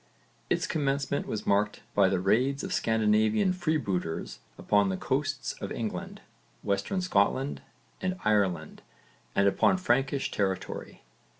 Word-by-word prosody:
Its -, -, +1 dB
commencement 140 Hz, -1 st, -1 dB
was 110 Hz, -, -4 dB
marked 105 Hz, +1 st, +1 dB
by 100 Hz, -2 st, +4 dB
the 95 Hz, -, +1 dB
raids 130 Hz, +9 st, +2 dB
of 190 Hz, -1 st, -3 dB
Scandinavian 110 Hz, -, +2 dB
freebooters 100 Hz, -, -2 dB, 0.2 s
upon 100 Hz, -1 st, +2 dB
the 95 Hz, -, -1 dB
coasts -, -, -1 dB
of -, -, -4 dB
England, -, -, -4 dB, 0.4 s
Western 100 Hz, -, -1 dB
Scotland 135 Hz, -, +1 dB, 0.4 s
and 185 Hz, 0 st, -1 dB
Ireland 95 Hz, -7 st, +1 dB, 0.5 s
and 100 Hz, -, +4 dB
upon 145 Hz, -, +3 dB
Frankish 135 Hz, -4 st, +1 dB
territory. 95 Hz, -2 st, -3 dB
110 Hz, 120 wpm, -28 LUFS, 100-140 Hz, 0.5 s, by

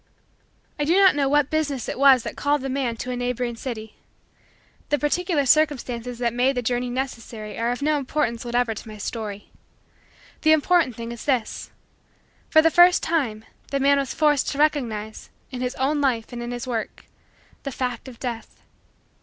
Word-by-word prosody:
I -, -, +1 dB
do 325 Hz, +4 st, +2 dB
not 390 Hz, -1 st, +7 dB
know 280 Hz, -2 st, +1 dB
what 290 Hz, -1 st, +2 dB
business 295 Hz, -6 st, -1 dB
it -, -, -4 dB
was 270 Hz, -3 st, +6 dB
that -, -, -6 dB
called 290 Hz, 0 st, +1 dB
the 270 Hz, -, -4 dB
man 255 Hz, -3 st, -1 dB
to 250 Hz, +2 st, -4 dB
a -, -, -2 dB
neighboring 245 Hz, -1 st, -2 dB
city. 220 Hz, -3 st, -7 dB, 0.9 s
The 295 Hz, -, +2 dB
particular 295 Hz, 0 st, 0 dB
circumstances 250 Hz, -4 st, +1 dB
that 235 Hz, -1 st, -1 dB
made 250 Hz, +2 st, +1 dB
the 245 Hz, -, -1 dB
journey 245 Hz, +1 st, -1 dB
necessary 230 Hz, -4 st, -5 dB
are 230 Hz, +1 st, 0 dB
of 245 Hz, +3 st, -3 dB
no 300 Hz, 0 st, +2 dB
importance 260 Hz, -4 st, -1 dB
whatever 240 Hz, -1 st, 0 dB
to 215 Hz, -, -9 dB
my 215 Hz, -1 st, -9 dB
story. 205 Hz, -1 st, -6 dB, 0.9 s
The 315 Hz, 0 st, +5 dB
important 315 Hz, -4 st, +3 dB
thing 230 Hz, +1 st, -6 dB
is 235 Hz, -, -8 dB
this: 255 Hz, -6 st, -1 dB, 0.8 s
for 315 Hz, -1 st, +6 dB
the 325 Hz, -, +4 dB
first 350 Hz, +1 st, +6 dB
time 235 Hz, -10 st, -1 dB, 0.2 s
the 275 Hz, -, -1 dB
man 280 Hz, +1 st, +4 dB
was 275 Hz, -, -2 dB
forced 295 Hz, -3 st, +2 dB
to 275 Hz, -, -4 dB
recognize, 235 Hz, -8 st, -1 dB, 0.2 s
in 250 Hz, -1 st, -5 dB
his 250 Hz, 0 st, -2 dB
own 285 Hz, +3 st, 0 dB
life 245 Hz, -4 st, 0 dB
and 240 Hz, -, -5 dB
in 240 Hz, -, -5 dB
his 245 Hz, -1 st, -5 dB
work, 235 Hz, -4 st, -4 dB, 0.6 s
the 275 Hz, -, -5 dB
fact 250 Hz, -1 st, -4 dB
of 245 Hz, -3 st, -11 dB
Death. 235 Hz, -3 st, -6 dB
255 Hz, 185 wpm, -23 LUFS, 235-290 Hz, 0.9 s, not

